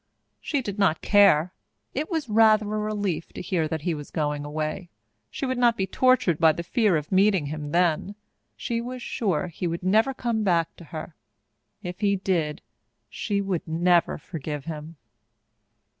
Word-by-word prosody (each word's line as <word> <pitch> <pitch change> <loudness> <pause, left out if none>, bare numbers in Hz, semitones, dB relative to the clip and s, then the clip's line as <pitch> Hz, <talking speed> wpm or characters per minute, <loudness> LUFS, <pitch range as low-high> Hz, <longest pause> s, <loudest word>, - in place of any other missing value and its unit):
She 285 -4 -2
did 205 -2 -5
not 185 -5 +2
care. 190 -4 +5 0.4
It 295 +4 -2
was 320 -6 -2
rather 215 -1 +5
a 215 +1 -2
relief 205 -5 -2
to - - -7
hear 170 -4 0
that 160 -1 -4
he 175 - 0
was 150 -2 -7
going 150 -2 -2
away. 155 +4 -4 0.4
She - - -4
would 260 -1 -2
not 240 -2 +4
be 190 - 0
tortured 255 - +2
by 160 -2 +5
the 170 - -5
fear 210 -2 +2
of 150 -1 -6
meeting 190 -3 +3
him 150 0 -5
then. 175 +4 +1 0.4
She 230 -1 -2
was 250 +1 -6
sure 190 -7 -1
he 175 +1 -4
would 170 +1 -4
never 220 +8 +3
come 235 -3 -1
back 170 -4 +1
to 170 - -12
her. 155 +1 -7 0.7
If 180 +1 -6
he 200 -1 +2
did, 175 -5 -1 0.5
she 200 -2 -1
would 190 -4 -3
never 170 +2 +2
forgive 150 -3 -6
him. 160 0 -7
180 Hz, 175 wpm, -25 LUFS, 160-215 Hz, 0.7 s, care